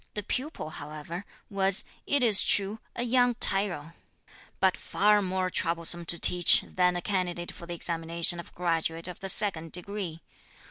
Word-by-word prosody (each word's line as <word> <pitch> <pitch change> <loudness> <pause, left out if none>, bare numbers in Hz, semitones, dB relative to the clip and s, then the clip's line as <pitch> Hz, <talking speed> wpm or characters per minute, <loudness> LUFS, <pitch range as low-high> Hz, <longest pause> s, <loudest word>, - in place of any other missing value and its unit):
The 210 - -3
pupil, 255 - -5
however, 155 +6 -8 0.2
was, 195 0 +1 0.2
it 285 -2 +2
is 215 -5 +7
true, 205 +2 +1 0.2
a - - -2
young 245 0 +2
tyro, 180 -8 +3 0.7
but 190 -1 +2
far 210 +1 +1
more 185 -1 -2
troublesome 170 0 +1
to 170 - +1
teach 175 0 +4
than 180 -1 0
a 175 - -4
candidate 180 -3 -3
for 170 - -12
the 175 - -5
examination 170 +1 +1
of 170 - -11
graduate 165 -1 -2
of 180 - -9
the 195 - -4
second 175 -5 0
degree. 180 -3 -5
180 Hz, 155 wpm, -27 LUFS, 170-200 Hz, 0.7 s, is